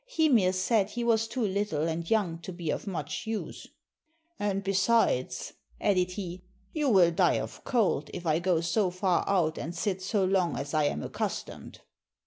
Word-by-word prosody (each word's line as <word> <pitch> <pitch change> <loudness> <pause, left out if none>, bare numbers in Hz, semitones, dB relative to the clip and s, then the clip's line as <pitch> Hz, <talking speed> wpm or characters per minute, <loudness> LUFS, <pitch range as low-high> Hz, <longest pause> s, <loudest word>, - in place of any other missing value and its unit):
Hymir 285 - +3
said 195 +2 +1
he 240 +2 -4
was 225 -1 +2
too 240 0 -2
little 190 -6 -1
and 165 +1 -3
young 190 -7 +1
to 180 - -7
be 170 -3 -3
of - - -4
much 170 +1 -4
use. 220 -1 -5 0.7
"And 200 -1 -1
besides," 195 - +1 0.3
added 185 -2 +2
he, 185 -2 -6 0.3
"you 300 -3 +1
will 185 -6 +5
die 165 - +3
of - - -7
cold, 210 - +1
if 180 -1 -7
I 155 0 +2
go 175 -2 +1
so 180 +4 +1
far 185 0 +1
out 170 -5 +1
and 165 +4 -5
sit 190 +1 -2
so 195 +1 +1
long 185 -2 +1
as 140 - -5
I 155 -1 +3
am 75 - -1
accustomed." - - -5
185 Hz, 175 wpm, -29 LUFS, 170-210 Hz, 0.7 s, will